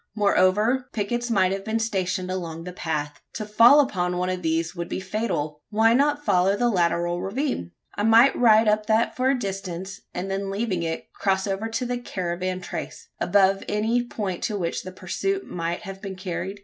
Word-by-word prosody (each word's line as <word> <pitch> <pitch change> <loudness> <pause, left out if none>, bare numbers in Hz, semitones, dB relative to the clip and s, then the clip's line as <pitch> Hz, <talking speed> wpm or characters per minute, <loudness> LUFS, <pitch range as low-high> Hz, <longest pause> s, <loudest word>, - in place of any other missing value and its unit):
Moreover, 210 +5 +2
pickets 240 +3 -2
might 190 -5 +3
have 195 0 -3
been 220 +2 -1
stationed 185 -4 -1
along 165 -3 -4
the 180 +1 -7
path. 150 -4 -3
To 215 - -4
fall 230 +7 +7
upon 180 -10 +1
one 180 +1 0
of 185 0 -3
these 165 0 -1
would 170 -1 -5
be - - -3
fatal. 185 -7 -3
Why 225 +2 +4
not 290 +3 +2
follow 190 0 +3
the 240 +2 +2
lateral 175 -1 +1
ravine? 195 - -3 0.2
I - - -4
might 225 +5 +6
ride 220 -2 +5
up 210 0 +2
that 220 +1 +2
for 260 +1 +1
a 270 - +2
distance, 190 -3 -5
and 185 +2 -4
then 195 0 -2
leaving 195 -3 -1
it, 165 -1 -4
cross 190 -1 0
over 200 +2 -2
to 225 +2 -2
the 245 0 -2
caravan 185 -3 -3
trace - - -7
above 195 -1 +3
any 220 +4 +1
point 205 -7 -4
to 210 - -2
which 170 -3 -2
the 185 - -8
pursuit 390 - -2
might 170 0 -3
have 195 -2 -8
been 195 -2 -6
carried? 185 +2 -5
195 Hz, 190 wpm, -24 LUFS, 180-225 Hz, 0.2 s, fall